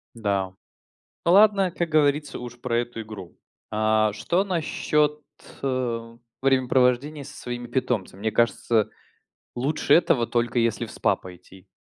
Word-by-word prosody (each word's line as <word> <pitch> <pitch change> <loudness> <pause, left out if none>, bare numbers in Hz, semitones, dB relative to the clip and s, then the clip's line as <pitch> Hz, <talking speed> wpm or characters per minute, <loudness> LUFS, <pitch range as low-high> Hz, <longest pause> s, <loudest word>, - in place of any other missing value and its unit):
Да. 100 -4 -1 0.7
Ладно, 195 +1 +5
как 170 -1 -2
говорится, 150 -2 +1
уж 120 0 -9
про 120 -2 0
эту 120 -1 -4
игру. 105 -5 -10 0.3
А 110 0 +2
что 170 - 0
насчет, 150 -4 0 0.4
э, 120 -3 -2 0.2
времяпровождения 130 +2 +2
со - - -11
своими 120 0 -6
питомцами? 115 -6 -2
Мне 110 +1 0
кажется, 115 0 +1 0.7
лучше 140 +3 +1
этого 140 -7 +4
только 120 +1 0
если 115 -1 0
в - - -11
СПА - - +1
пойти. 90 +1 -14
120 Hz, 125 wpm, -25 LUFS, 110-145 Hz, 0.7 s, Ладно